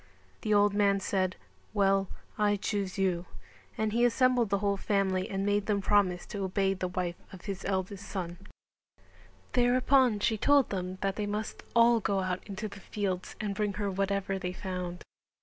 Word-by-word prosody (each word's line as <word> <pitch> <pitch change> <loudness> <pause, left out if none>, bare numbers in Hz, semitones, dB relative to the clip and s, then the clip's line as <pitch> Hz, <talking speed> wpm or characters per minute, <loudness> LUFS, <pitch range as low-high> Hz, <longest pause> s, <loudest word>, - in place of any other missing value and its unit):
The 215 - -2
old 205 0 +5
man 200 -1 +3
said 185 -1 0 0.4
"Well, 195 -1 +3 0.3
I 210 -1 +2
choose 200 -1 -2
you," 185 -2 0 0.5
and 215 -1 0
he 235 +1 +2
assembled 245 -1 +3
the 200 - +2
whole 200 0 +1
family 195 -2 0
and 195 0 -2
made 205 0 +1
them 205 -2 +2
promise 195 -3 +2
to 200 -1 -5
obey 195 +1 +1
the 185 -1 -3
wife 180 -1 -3
of 185 -2 -11
his 195 -2 -4
eldest 195 0 -2
son. 175 -3 -4 1.1
Thereupon 250 -1 +4
she 215 +1 +1
told 285 +1 +4
them 185 -1 -3
that 195 0 -1
they 210 -1 -1
must 210 +1 -4
all 235 0 +6
go 200 -2 0
out 185 -1 -2
into 205 +1 -4
the 200 -1 -10
fields 190 -2 -3
and 205 -2 -2
bring 205 0 -1
her 200 0 -2
whatever 195 0 -1
they 180 -1 -3
found. 180 -2 -5
200 Hz, 175 wpm, -30 LUFS, 190-210 Hz, 1.1 s, all